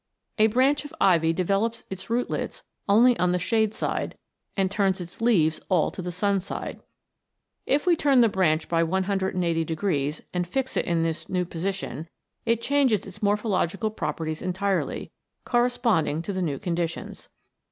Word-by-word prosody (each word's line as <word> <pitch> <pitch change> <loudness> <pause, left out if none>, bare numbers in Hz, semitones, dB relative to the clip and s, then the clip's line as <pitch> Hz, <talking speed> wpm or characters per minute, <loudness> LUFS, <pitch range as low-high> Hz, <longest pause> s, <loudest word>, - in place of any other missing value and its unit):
A 215 - +7
branch 260 +6 +2
of 290 +2 -10
ivy 165 -4 +4
develops 195 +6 0
its 190 +3 -7
rootlets 245 - -2 0.3
only 235 +5 +6
on 180 0 +2
the - - +2
shade 220 +4 +1
side, - - -2 0.4
and 190 -1 +1
turns 195 -1 +1
its 175 +4 -9
leaves 170 -10 +3
all 180 -5 +2
to - - -6
the 180 0 -4
sun 200 +2 +1
side. 185 - -6 0.9
If 285 +2 +2
we 355 -2 +5
turn 280 -5 +4
the 230 - +6
branch 170 -6 +1
by 165 -1 +2
180 185 -1 0
degrees 155 -3 -1
and 180 -1 -1
fix 260 +7 -2
it - - +1
in 170 -1 +1
this 165 -1 -3
new 180 -1 0
position, 170 -3 -4 0.4
it 230 0 +2
changes 275 -7 +2
its 190 -3 -11
morphological 205 -1 0
properties 155 -4 -3
entirely, 190 +1 -1 0.3
corresponding 240 - +1
to 200 - -4
the 185 - -2
new 150 -6 -1
conditions. 170 +1 -4
190 Hz, 160 wpm, -26 LUFS, 170-225 Hz, 0.9 s, A